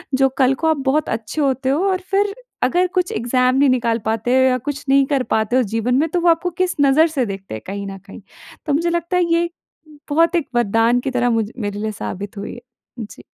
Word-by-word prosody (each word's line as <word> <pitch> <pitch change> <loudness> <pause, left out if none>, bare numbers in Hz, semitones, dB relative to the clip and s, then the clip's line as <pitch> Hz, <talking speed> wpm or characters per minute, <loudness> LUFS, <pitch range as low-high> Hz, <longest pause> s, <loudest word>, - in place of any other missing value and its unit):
जो 270 0 +4
कल 260 0 +4
को 320 - -1
आप 315 -2 +2
बहुत 305 +2 +1
अच्छे 225 +7 -3
होते 265 -1 0
हो 300 +7 +1
और 375 0 -1
फ़िर 400 +1 +2 0.3
अगर 355 +8 +2
कुछ 360 - -1
एग्जाम 250 +2 +1
नहीं 275 0 +4
निकाल 235 -2 +1
पाते 225 +3 0
हो - - +5
या 255 -1 +3
कुछ 285 0 -5
नहीं 275 0 +5
कर 275 -3 0
पाते 220 +3 0
हो 255 - +3
जीवन 245 +3 +1
में 310 +4 +2
तो 350 +1 -1
वो 345 - +4
आपको 335 +2 +2
किस 365 - 0
नज़र 285 +4 +5
से 250 - +2
देखते 195 - -7
हैं 110 - -7
कहीं 200 0 -5
न 195 0 -7
कहीं। 200 - -11 0.4
तो 295 - 0
मुझे 335 +4 +1
लगता 345 +1 -1
है 360 - +3
ये 340 0 +1 0.6
बहुत 330 +4 +3
एक 310 - -2
वरदान 230 +2 +2
की 265 - -3
तरह 245 0 +2
मुझ 215 -1 -2
मेरे 205 -2 -4
लिए 215 0 -2
साबित 205 0 -6
हुई 200 - -6
है। - - -9 0.4
जी। 215 - -10
260 Hz, 240 wpm, -19 LUFS, 225-320 Hz, 0.6 s, हो